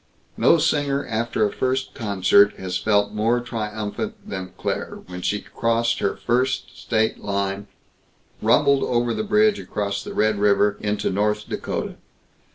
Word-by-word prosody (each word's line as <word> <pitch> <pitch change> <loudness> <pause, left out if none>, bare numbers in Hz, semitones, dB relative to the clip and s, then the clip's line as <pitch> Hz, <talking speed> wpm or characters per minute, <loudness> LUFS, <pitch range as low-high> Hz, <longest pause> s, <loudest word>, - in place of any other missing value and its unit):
No 170 - +5
singer 145 -3 +1
after 115 -1 0
a 105 - -1
first 130 +1 -1
concert 100 -3 +3
has 95 -1 -4
felt 105 +1 +1
more 115 +3 +1
triumphant 110 -3 -4
than 95 -1 -5
Claire - - -3
when 90 0 -8
she 105 +3 -1
crossed 115 0 0
her 100 - 0
first 125 +2 -1
state 110 -1 0
line; 100 0 -2 0.7
rumbled 140 +5 +4
over 120 -1 +1
the - - -2
bridge 210 0 +3
across 100 -1 -3
the - - -7
Red 110 -1 +2
River 105 0 +3
into 105 0 -1
North 105 +2 0
Dakota. - - -4
110 Hz, 145 wpm, -23 LUFS, 100-120 Hz, 0.7 s, No